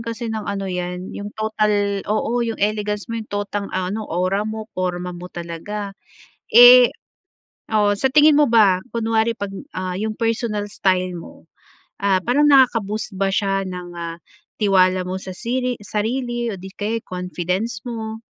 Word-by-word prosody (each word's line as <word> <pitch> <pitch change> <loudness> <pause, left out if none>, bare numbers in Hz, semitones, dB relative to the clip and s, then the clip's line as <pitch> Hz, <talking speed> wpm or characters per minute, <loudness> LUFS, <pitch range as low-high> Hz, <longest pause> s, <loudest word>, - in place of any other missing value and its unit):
kasi 230 0 -4
ng 215 -2 -4
ano 200 -1 -2
'yan 180 0 -4
'yong 205 - -6
total 210 -2 0
oo 225 +3 0
'yong 230 -2 -1
elegance 210 0 -1
mo 230 -1 -4
'yong 220 - -10
total, 205 0 -3
ah, 185 0 -2
ano 220 - -3
aura 185 +4 0
mo, 220 0 -5
porma 180 -1 -3
mo 175 +1 -8
talaga. 180 +4 -6 0.6
Eh, - - +9 0.8
oo 205 -1 +3
sa 235 +7 +1
tingin 305 0 +7
mo 295 - +5
ba 205 -5 +5
kunwari 225 0 +1
'pag, 200 -1 -4 0.2
ah, 185 -1 -3
'yong 215 0 -3
personal 225 -2 -1
style 185 -2 0
mo, 165 - -13 0.6
ah, 195 -2 +3
parang 270 +8 +3
nakaka-boost 225 -6 +3
ba 195 - +2
siya 195 -1 +1
ng, 180 -1 -6
ah, 170 0 -5 0.4
tiwala 185 -2 +3
mo 185 +1 -3
sa 190 - -6
siri 250 +4 -2
sarili 240 +4 -2
o 195 - -7
di 190 - -9
kaya 220 +2 -2
sa - - -69
confidence 180 +4 -3
mo? 220 -2 -5
205 Hz, 165 wpm, -21 LUFS, 185-225 Hz, 0.8 s, Eh